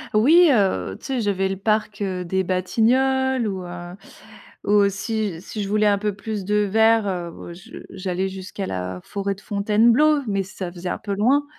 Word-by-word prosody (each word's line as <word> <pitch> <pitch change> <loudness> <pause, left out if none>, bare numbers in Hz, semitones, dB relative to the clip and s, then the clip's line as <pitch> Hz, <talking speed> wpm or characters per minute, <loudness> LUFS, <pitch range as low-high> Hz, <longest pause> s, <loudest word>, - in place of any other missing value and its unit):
Oui, 320 +10 +6
heu, 100 - +1
tu - - -15
sais, 260 -3 -1
j'avais 195 -2 0
le 190 - -2
parc, 215 +1 -1
heu, 185 -2 -2
des 190 +2 0
Batignolles 250 +7 +1
ou 190 -2 -4
heu, 175 0 -8 0.7
aussi, 200 -2 +1
si 210 +2 -6
je 195 - -4
voulais 215 0 +2
un 205 -1 +4
peu 205 0 -2
plus 205 -1 -5
de 210 +2 0
vert, 220 +1 +3
heu, 175 -2 -3
bah, 170 - -10
je 175 - -12
j'allais 190 0 -3
jusqu'à 190 +1 -6
la 90 - -4
forêt 200 -1 -3
de 195 - -17
Fontainebleau, 230 +10 +3
mais 195 -2 0
ça 185 -1 -7
faisait 180 0 -6
un - - -3
peu 200 -2 -4
loin. 260 +8 +2
200 Hz, 185 wpm, -22 LUFS, 185-220 Hz, 0.7 s, Oui